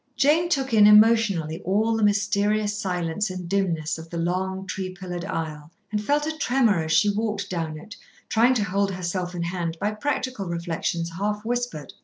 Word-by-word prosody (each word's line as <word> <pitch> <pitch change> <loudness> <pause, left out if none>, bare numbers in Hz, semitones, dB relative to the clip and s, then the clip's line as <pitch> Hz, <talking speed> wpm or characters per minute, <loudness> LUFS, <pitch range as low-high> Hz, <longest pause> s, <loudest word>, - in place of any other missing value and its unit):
Jane 315 +5 +3
took 270 -6 0
in 210 -2 +7
emotionally 210 -7 +4
all 215 +4 +1
the 225 - -1
mysterious 205 +1 +1
silence 185 -1 -2
and 185 -1 -6
dimness 170 -5 -1
of 160 0 -10
the 170 - -5
long 190 +3 -2
tree 190 0 -4
pillared 180 -1 -6
aisle, 155 -4 -4 0.2
and 210 -1 -1
felt 295 +5 +1
a 315 0 -3
tremor 245 - +2
as 160 - -4
she 160 +6 +4
walked 210 -2 -2
down 165 -3 -3
it, 205 +7 -11 0.3
trying 240 +3 +3
to 220 - +1
hold 200 +1 0
herself 180 -1 -3
in 170 - -2
hand 170 -1 -3
by 210 - 0
practical 255 -3 -3
reflections 170 0 -2
half 210 +1 -2
whispered. 240 - -3
195 Hz, 180 wpm, -24 LUFS, 170-215 Hz, 0.3 s, in